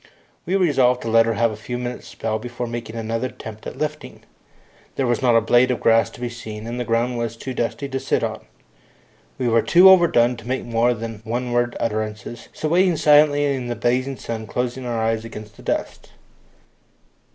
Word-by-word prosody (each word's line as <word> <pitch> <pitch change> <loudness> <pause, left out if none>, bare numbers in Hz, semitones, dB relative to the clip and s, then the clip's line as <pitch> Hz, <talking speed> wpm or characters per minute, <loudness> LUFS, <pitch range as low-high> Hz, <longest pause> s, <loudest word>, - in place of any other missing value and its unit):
We 185 - +1
resolved 135 -9 +3
to 115 - -3
let 115 0 +4
her 115 - 0
have 115 +1 +2
a - - -6
few 120 +3 -6
minutes' 125 0 -5
spell 110 -1 -3
before 120 +1 -5
making 115 -1 -6
another 115 +2 -2
attempt 110 -3 -10
at - - -8
lifting. 150 +1 -5 0.7
There 135 - 0
was 120 -1 0
not 120 -3 +3
a 115 - +5
blade 120 +3 +4
of 125 - 0
grass 115 0 +3
to - - -14
be 125 - -3
seen, 110 -2 -8
and 120 +2 -5
the - - -1
ground 120 +1 0
was 115 -1 -3
too 130 +2 -6
dusty 120 +4 -2
to 135 -1 -3
sit - - 0
on. - - -3 0.9
We 125 - -1
were 115 -1 +4
too 185 +2 +7
overdone 125 -10 +4
to 115 0 -11
make 130 +1 -2
more 120 +1 +1
than 115 -1 -7
one 120 +2 -3
worded 120 0 0
utterances, 110 +1 -4
so 155 - -4
waited 180 0 +3
silently 145 -1 +5
in 135 -3 -1
the 120 - -3
blazing 125 +3 0
sun, 110 -1 -6
closing 125 +2 -3
our 120 -1 -2
eyes 110 0 0
against 110 -2 -10
the - - -13
dust. - - -3
120 Hz, 205 wpm, -22 LUFS, 115-130 Hz, 0.9 s, too